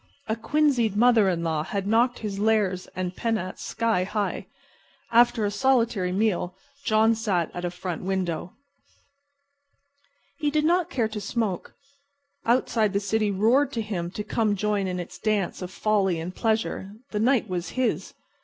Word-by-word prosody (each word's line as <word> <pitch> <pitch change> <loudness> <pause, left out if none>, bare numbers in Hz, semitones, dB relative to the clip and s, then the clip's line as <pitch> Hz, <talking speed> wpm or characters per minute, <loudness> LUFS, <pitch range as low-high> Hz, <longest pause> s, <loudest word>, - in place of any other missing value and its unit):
A 220 - 0
quinzied 240 -2 +1
mother 225 -3 +5
in 170 -2 -1
law 160 -2 0
had 195 +5 -3
knocked 235 +4 +3
his 200 -3 -4
lares 205 -4 +1
and 185 -1 -3
penates 220 -5 -2
sky 225 -5 0
high. 205 +2 -2 0.6
After 235 -1 +4
his 205 - -1
solitary 230 -6 +2
meal 185 -2 0 0.3
John 220 -1 +4
sat 200 -7 -1
at 175 0 -4
a - - 0
front 175 -1 -5
window. 180 -2 -2 1.9
He 295 - +1
did 305 +1 +1
not 350 +1 +2
care 240 -9 0
to 215 -1 -5
smoke. 200 -3 -2 0.7
Outside 230 -3 +2
the 200 - +2
city 215 +1 0
roared 225 +9 +3
to 230 - -1
him 180 -5 -3
to 210 - -2
come 215 -1 0
join 205 -1 0
in 180 -1 -3
its 175 - -7
dance 210 -5 -1
of 180 - -4
folly 195 -3 +1
and 170 +3 -5
pleasure. 220 -3 -1 0.2
The 210 - -1
night 245 +2 +3
was 180 -2 -3
his. 255 -1 -1
210 Hz, 160 wpm, -25 LUFS, 185-230 Hz, 1.9 s, mother